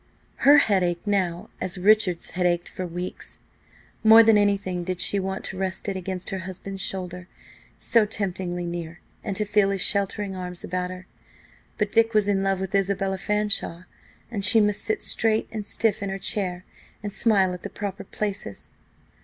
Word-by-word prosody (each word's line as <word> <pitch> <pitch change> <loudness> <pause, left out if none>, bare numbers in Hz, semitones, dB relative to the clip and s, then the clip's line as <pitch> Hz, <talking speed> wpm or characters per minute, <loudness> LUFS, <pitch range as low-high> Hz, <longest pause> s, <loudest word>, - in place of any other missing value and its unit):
Her 285 +2 +7
head 205 -9 +3
ached 175 +1 -1
now 185 -4 -1
as 185 +1 -2
Richard's 185 -2 +3
had 180 0 +1
ached 175 0 0
for 185 - -5
weeks. 175 +2 -7 0.7
More 225 +1 +9
than 225 -1 +5
anything 200 -3 +1
did 180 0 -3
she 200 - +3
want 190 0 -3
to 190 - -6
rest 190 0 -3
it 195 - -2
against 185 -1 -4
her 190 - -3
husband's 190 +1 -7
shoulder, 180 -1 -5 0.5
so 225 -3 +3
temptingly 185 -4 -3
near, 170 -1 -5 0.2
and 200 -3 -3
to 210 +2 -1
feel 205 -1 +3
his 195 -1 -2
sheltering 200 0 0
arms 180 -1 -6
about 180 0 -2
her. 185 0 -9 0.7
But 210 -1 -1
Dick 230 0 +3
was 210 -1 +3
in 200 -1 +2
love 195 -1 0
with 190 0 -4
Isabella 195 -1 0
Fanshawe, 210 -4 -1 0.5
and 205 -4 -3
she 225 +4 +8
must 210 0 +2
sit 220 - -2
straight 220 -1 +1
and 215 -2 -5
stiff 220 -2 0
in 200 - -2
her 195 - -3
chair 185 -2 -2 0.4
and 205 -1 -4
smile 195 -5 +3
at 180 - -7
the 205 - -6
proper 200 -1 -5
places. 200 - -5
195 Hz, 180 wpm, -25 LUFS, 180-205 Hz, 0.7 s, More